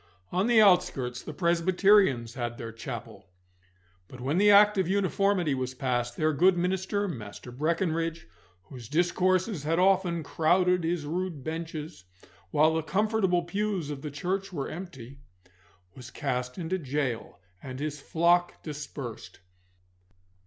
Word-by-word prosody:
On 185 +5 +1
the 240 -2 +5
outskirts 180 - +3
the - - -7
Presbyterians 170 - +3
had 120 -2 -4
their 115 -1 -6
chapel; 115 -3 -8 0.8
but 130 - -12
when 140 +8 0
the 205 +1 +5
Act 205 0 +6
of 185 - +1
Uniformity 195 -3 +1
was 130 -1 -3
passed, 120 -2 -2
their 155 0 +1
good 180 +5 +4
minister, 190 +3 -1
Master 115 - -8
Breckinridge, 165 +3 -1 0.4
whose 120 +2 -11
discourses 180 +3 +1
had 160 +3 0
often 180 -3 +2
crowded 180 +4 +2
his 165 -2 -1
rude 170 -2 -3
benches 160 - -6 0.4
while 155 +8 +3
the 160 - 0
comfortable 190 +1 +1
pews 195 -3 -2
of 140 -2 -6
the 150 - -5
church 185 +7 -3
were 145 -6 -4
empty, 140 -7 -9 0.8
was 125 -1 -10
cast 125 -2 -3
into 180 +2 -2
gaol, 135 -5 -3 0.2
and 130 -1 -7
his 150 0 -4
flock 175 +3 +1
dispersed. 140 - -7
165 Hz, 135 wpm, -28 LUFS, 135-185 Hz, 0.8 s, Act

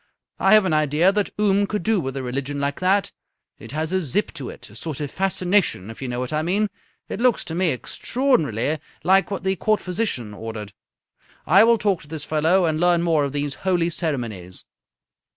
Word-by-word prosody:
I 195 +3 +6
have 215 -2 +5
an 175 - +1
idea 155 +4 +3
that 205 0 0
Oom 200 -1 +3
could 210 -4 -3
do 220 0 +2
with 135 -4 -4
a 135 - -3
religion 140 +3 -3
like 140 0 -2
that. 195 +2 +2 0.5
It - - -9
has 155 +3 -2
a 190 - +2
zip 170 +7 -1
to 130 - -6
it. - - -10
A - - -15
sort 150 +4 -5
of 145 -2 -4
fascination, 185 - 0
if 115 - -12
you 135 - -3
know 120 0 -3
what 125 +3 -3
I 155 - +1
mean. 200 +6 0 0.4
It - - -5
looks 250 -3 +2
to 160 - -6
me 180 +1 +2
extraordinarily 150 - 0 0.2
like 195 +1 +4
what 200 - -4
the 190 0 +1
Court 215 +4 +1
physician 180 - -3
ordered. 105 -1 -7 0.7
I 195 +5 +6
will 230 0 +5
talk 200 -5 0
to 150 - -13
this 155 -1 -5
fellow 165 +4 +2
and 155 -1 0
learn 175 0 +3
more 160 -4 +2
of 140 - -3
these 145 0 -2
holy 175 -3 +1
ceremonies." 115 - -4
165 Hz, 205 wpm, -23 LUFS, 140-195 Hz, 0.7 s, I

